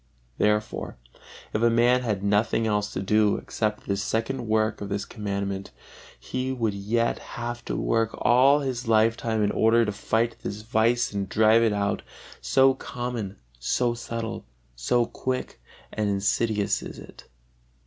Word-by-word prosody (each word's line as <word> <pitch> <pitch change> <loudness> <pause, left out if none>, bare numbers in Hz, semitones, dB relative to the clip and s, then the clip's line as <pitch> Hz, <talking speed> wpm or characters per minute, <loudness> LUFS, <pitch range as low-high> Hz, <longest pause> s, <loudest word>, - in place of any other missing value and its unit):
Therefore 105 -7 0 0.6
if 105 - 0
a 120 - +5
man 120 +2 +4
had 105 -5 -2
nothing 105 +3 +2
else 105 -1 0
to 95 - -3
do 105 +1 +3
except 105 -1 -3
this 100 0 -1
second 115 +4 -2
work 110 0 +1
of 100 - -5
this 100 0 -2
Commandment, 100 -2 -4 0.5
he 130 +1 -3
would 115 -5 -1
yet 110 +4 0 0.2
have 120 0 -4
to - - -3
work 115 -1 +1
all 135 +4 +5
his 125 -3 -3
life 115 0 +4
time 110 -2 -1
in 105 - +2
order 115 +1 +4
to 105 - -1
fight 115 +3 -1
this 105 +1 -5
vice 115 +2 +2
and 100 -2 -3
drive 110 +2 +5
it 115 -1 +3
out, 100 -1 -1 0.4
so 135 0 +4
common, 120 -6 -5 0.2
so 120 - +1
subtile, 115 -1 -5 0.3
so 120 - +1
quick 130 +2 -4 0.3
and 105 -1 0
insidious 105 +1 +1
is - - -8
it. - - -13
110 Hz, 155 wpm, -26 LUFS, 105-120 Hz, 0.6 s, a